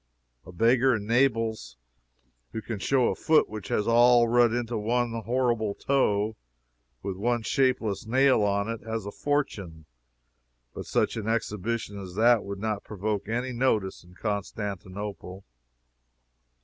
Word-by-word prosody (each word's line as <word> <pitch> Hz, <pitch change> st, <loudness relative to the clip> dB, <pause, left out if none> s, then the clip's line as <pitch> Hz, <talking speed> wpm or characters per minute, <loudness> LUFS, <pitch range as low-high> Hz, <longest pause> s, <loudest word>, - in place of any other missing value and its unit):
A -, -, -9 dB
beggar 120 Hz, +7 st, +3 dB
in 105 Hz, -2 st, -4 dB
Naples 115 Hz, -, 0 dB, 0.8 s
who 110 Hz, -, -4 dB
can 110 Hz, -4 st, -5 dB
show 130 Hz, +4 st, +2 dB
a -, -, -2 dB
foot 160 Hz, -1 st, +3 dB
which 110 Hz, -1 st, -8 dB
has 105 Hz, -, -1 dB
all 120 Hz, 0 st, +5 dB
run 120 Hz, 0 st, +4 dB
into 120 Hz, 0 st, -2 dB
one 120 Hz, +2 st, 0 dB
horrible 115 Hz, -2 st, 0 dB
toe, 110 Hz, -6 st, +1 dB, 0.7 s
with 95 Hz, -2 st, -4 dB
one 120 Hz, +3 st, 0 dB
shapeless 120 Hz, -6 st, 0 dB
nail 130 Hz, 0 st, +4 dB
on 100 Hz, 0 st, +1 dB
it, 115 Hz, -1 st, -4 dB
has 110 Hz, -2 st, -4 dB
a 100 Hz, -, -5 dB
fortune 100 Hz, -, -3 dB, 0.9 s
but -, -, -7 dB
such -, -, 0 dB
an 110 Hz, -1 st, -4 dB
exhibition 110 Hz, -1 st, -2 dB
as 90 Hz, -2 st, -9 dB
that 115 Hz, +1 st, +4 dB
would 100 Hz, 0 st, -6 dB
not 105 Hz, 0 st, -3 dB
provoke 105 Hz, 0 st, -3 dB
any 120 Hz, +3 st, -2 dB
notice 115 Hz, -8 st, 0 dB
in 90 Hz, +1 st, -18 dB
Constantinople. 100 Hz, -2 st, -5 dB
110 Hz, 140 wpm, -27 LUFS, 100-120 Hz, 0.9 s, all